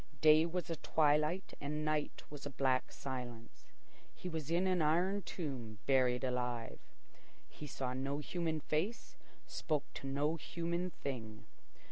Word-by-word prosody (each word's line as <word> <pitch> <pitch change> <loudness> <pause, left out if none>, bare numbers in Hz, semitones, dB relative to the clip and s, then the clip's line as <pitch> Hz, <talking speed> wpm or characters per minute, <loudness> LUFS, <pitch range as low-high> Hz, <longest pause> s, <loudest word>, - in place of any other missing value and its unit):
Day 155 +2 +7
was 175 0 -2
a 165 - -1
twilight 150 +5 +2
and 150 +2 -2
night 155 -1 0
was 145 -1 -6
a - - -3
black 130 -1 +1
silence. 125 -4 -6 0.5
He - - -6
was 160 -4 -3
in 175 +3 +3
an 185 -2 +3
iron 180 +6 +3
tomb, 130 - -4
buried 130 -2 +4
alive. 125 -2 -1 0.7
He 150 - -9
saw 130 -2 -2
no 135 +2 -1
human 160 0 -1
face, 165 +12 -1 0.3
spoke 150 -3 -1
to 135 - -6
no 145 +4 +1
human 170 +3 -2
thing. 115 -9 -5
150 Hz, 140 wpm, -36 LUFS, 130-165 Hz, 0.7 s, Day